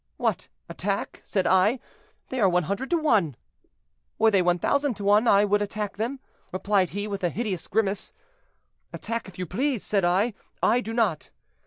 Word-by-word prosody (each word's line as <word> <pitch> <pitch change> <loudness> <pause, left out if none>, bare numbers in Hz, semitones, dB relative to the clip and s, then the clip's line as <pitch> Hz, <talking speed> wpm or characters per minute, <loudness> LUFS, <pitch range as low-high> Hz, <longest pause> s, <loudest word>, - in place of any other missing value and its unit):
'What! - - -1 0.2
attack?' - - -3
said 190 -3 -1
I; 190 +7 +4 0.5
'they 260 - -3
are 200 -4 +5
100 185 - -1
to 345 - +3
one.' 215 - +2 0.8
'Were 220 0 +4
they 195 -3 +4
1,000 200 - +1
to 200 - -7
one, 205 +3 +4
I 200 0 +5
would 205 0 +2
attack 205 0 -3
them,' 240 +6 -2 0.3
replied 190 -1 +1
he, 205 +3 -4
with 200 -2 -5
a 175 - +2
hideous 205 -4 -3
grimace. 205 -2 0 0.8
'Attack 230 -1 -4
if 190 - -13
you 180 - -3
please,' 245 - -1
said 200 -3 +1
I; 190 +7 +2 0.3
'I 245 - +4
do 225 -1 -5
not.' 215 -10 0
205 Hz, 170 wpm, -26 LUFS, 185-230 Hz, 0.8 s, are